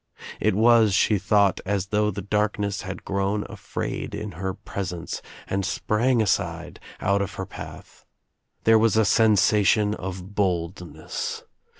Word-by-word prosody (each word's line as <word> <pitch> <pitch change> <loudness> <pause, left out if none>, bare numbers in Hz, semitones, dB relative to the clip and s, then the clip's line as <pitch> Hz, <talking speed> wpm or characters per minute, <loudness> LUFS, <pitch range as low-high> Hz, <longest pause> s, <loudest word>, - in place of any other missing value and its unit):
It - - +2
was, 110 -2 +5
she 105 +1 +3
thought, 100 0 +3
as 100 -1 -2
though 105 0 +2
the 100 -1 -5
darkness 105 0 -1
had 95 -1 -7
grown 100 +1 -1
afraid - - -5
in 105 0 -5
her 95 +2 -4
presence 90 -3 -5 0.2
and 95 0 -2
sprang 115 +5 +1
aside, 85 -3 -2 0.2
out 100 0 +2
of 100 +1 -4
her 95 - -4
path. - - -11 0.6
There 115 0 +6
was 110 -1 +3
a 110 - +4
sensation 105 -1 +4
of 95 0 -6
boldness. 90 -3 -3
100 Hz, 135 wpm, -24 LUFS, 95-105 Hz, 0.6 s, There